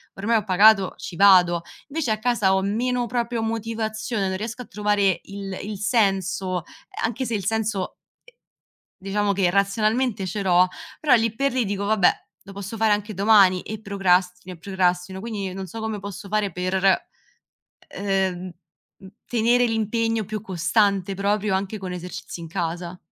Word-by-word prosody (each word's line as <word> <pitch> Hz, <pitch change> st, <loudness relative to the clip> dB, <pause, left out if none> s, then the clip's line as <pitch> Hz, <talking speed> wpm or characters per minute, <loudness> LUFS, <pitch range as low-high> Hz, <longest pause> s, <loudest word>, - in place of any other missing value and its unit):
ormai 225 Hz, +4 st, +1 dB
ho 210 Hz, -, -1 dB
pagato, 195 Hz, 0 st, +5 dB
ci 180 Hz, -, -8 dB
vado. 180 Hz, -4 st, +6 dB, 0.3 s
Vece 285 Hz, -5 st, -1 dB
a 215 Hz, -, 0 dB
casa 215 Hz, -4 st, +2 dB
ho 190 Hz, -, +1 dB
meno, 240 Hz, +5 st, 0 dB
proprio, 235 Hz, -1 st, -2 dB
motivazione, 220 Hz, -1 st, -2 dB
non 190 Hz, -, -2 dB
riesco 230 Hz, +4 st, -5 dB
a -, -, -16 dB
trovare 205 Hz, -2 st, +1 dB
il 195 Hz, -1 st, -7 dB
il 205 Hz, -1 st, -6 dB
senso, 195 Hz, -5 st, 0 dB
ehm, -, -, -7 dB
anche 240 Hz, +3 st, -2 dB
se 235 Hz, -, -3 dB
il 195 Hz, -, -3 dB
senso 215 Hz, -3 st, -1 dB, 1.1 s
diciamo 200 Hz, +1 st, 0 dB
che 190 Hz, -2 st, +2 dB
razionalmente 210 Hz, +2 st, +1 dB
ce 200 Hz, +3 st, -3 dB
l'ho, 180 Hz, 0 st, +4 dB, 0.3 s
però 290 Hz, -5 st, +5 dB
lì 225 Hz, -1 st, +1 dB
per 275 Hz, +4 st, 0 dB
lì 255 Hz, -2 st, +1 dB
dico: 200 Hz, 0 st, -2 dB
"Vabbè, 205 Hz, -4 st, +4 dB, 0.3 s
lo 195 Hz, -, -12 dB
posso 200 Hz, +3 st, -6 dB
fare 220 Hz, -1 st, +3 dB
anche 210 Hz, 0 st, -3 dB
domani" 195 Hz, -2 st, +5 dB
e 220 Hz, 0 st, -7 dB
procrastino 185 Hz, -3 st, 0 dB
e -, -, -21 dB
procrastino, 185 Hz, 0 st, -1 dB
quindi 200 Hz, -3 st, -4 dB
non 190 Hz, 0 st, -5 dB
so 225 Hz, +6 st, -8 dB
come 220 Hz, -2 st, -3 dB
posso 200 Hz, 0 st, -8 dB
fare 210 Hz, -2 st, 0 dB
per, 185 Hz, +2 st, -1 dB, 1.0 s
ehm, 190 Hz, -2 st, -1 dB, 0.6 s
mhmm, 190 Hz, -, -12 dB, 0.2 s
tenere 240 Hz, +1 st, +3 dB
l'impegno 225 Hz, 0 st, 0 dB
più 215 Hz, +2 st, -5 dB
costante 195 Hz, 0 st, +1 dB
proprio, 200 Hz, 0 st, 0 dB
anche 195 Hz, +3 st, -3 dB
con 190 Hz, -3 st, -6 dB
esercizi 180 Hz, 0 st, -7 dB
in 165 Hz, -, -7 dB
casa. 175 Hz, 0 st, -4 dB
200 Hz, 165 wpm, -23 LUFS, 190-220 Hz, 1.1 s, vado